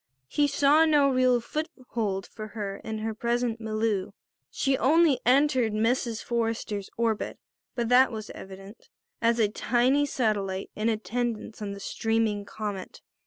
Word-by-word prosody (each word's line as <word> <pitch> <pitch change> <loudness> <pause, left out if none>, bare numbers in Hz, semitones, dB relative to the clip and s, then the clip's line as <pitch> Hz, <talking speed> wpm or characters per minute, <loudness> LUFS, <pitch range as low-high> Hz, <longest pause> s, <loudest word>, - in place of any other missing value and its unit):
He 290 - +2
saw 285 +3 +4
no 295 -3 +4
real 255 -2 +3
foothold 235 - -4
for 215 -1 -8
her 200 -2 -3
in 220 0 -5
her 220 +1 -3
present 235 +1 -1
milieu. 215 -3 -1 0.4
She 270 -1 +1
only 300 +3 +4
entered 260 -4 +3
Mrs. 230 +1 0
Forrester's 225 -4 -2
orbit, 225 -2 -1 0.4
that 245 +2 +4
was 215 -1 -6
evident, 195 +3 -11 0.3
as 230 0 +3
a 220 -3 +4
tiny 255 +6 +2
satellite 200 -7 -1
in 215 +2 0
attendance 225 0 -3
on 200 -1 -4
the 200 - -8
streaming 225 -1 -1
comet. 205 -3 -6
225 Hz, 135 wpm, -27 LUFS, 215-255 Hz, 0.4 s, saw